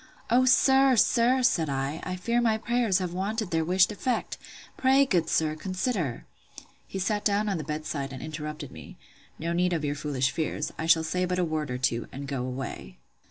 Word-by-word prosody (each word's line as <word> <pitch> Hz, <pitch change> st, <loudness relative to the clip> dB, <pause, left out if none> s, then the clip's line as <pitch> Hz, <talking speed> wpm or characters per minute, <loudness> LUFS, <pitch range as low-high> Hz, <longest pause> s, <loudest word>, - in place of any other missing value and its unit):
O, 255 Hz, +2 st, +5 dB
sir, 265 Hz, +1 st, +5 dB
sir, 245 Hz, +3 st, +3 dB
said 165 Hz, -, +2 dB
I, 135 Hz, +3 st, -2 dB
I 185 Hz, -, -4 dB
fear 235 Hz, +6 st, 0 dB
my 225 Hz, -2 st, +2 dB
prayers 230 Hz, -3 st, +1 dB
have 180 Hz, -2 st, -3 dB
wanted 205 Hz, +2 st, -2 dB
their 165 Hz, -1 st, +1 dB
wished 180 Hz, +4 st, +3 dB
effect! 245 Hz, +4 st, -2 dB, 0.4 s
Pray, 270 Hz, +1 st, +4 dB
good 180 Hz, -10 st, +1 dB
sir, 155 Hz, -1 st, +1 dB
consider—He 185 Hz, -, -5 dB
sat 205 Hz, +2 st, -1 dB
down 210 Hz, +1 st, +1 dB
on 195 Hz, -5 st, -1 dB
the -, -, -4 dB
bed 150 Hz, +1 st, -4 dB
side, 140 Hz, -3 st, -3 dB
and 130 Hz, -, -7 dB
interrupted 150 Hz, -2 st, -6 dB
me; 80 Hz, -3 st, -12 dB, 0.4 s
No 170 Hz, +1 st, -2 dB
need 180 Hz, +1 st, +1 dB
of 160 Hz, -3 st, -1 dB
your 145 Hz, -, 0 dB
foolish 140 Hz, -3 st, -1 dB
fears; 155 Hz, 0 st, -3 dB
I 160 Hz, -, -4 dB
shall 165 Hz, -1 st, +5 dB
say 180 Hz, +3 st, -1 dB
but 180 Hz, 0 st, -1 dB
a 180 Hz, -, +1 dB
word 155 Hz, -3 st, -2 dB
or 125 Hz, -, -2 dB
two, 120 Hz, -2 st, -1 dB
and 140 Hz, +1 st, -7 dB
go 135 Hz, -2 st, -3 dB
away. 125 Hz, -, -6 dB
175 Hz, 200 wpm, -27 LUFS, 150-215 Hz, 0.4 s, O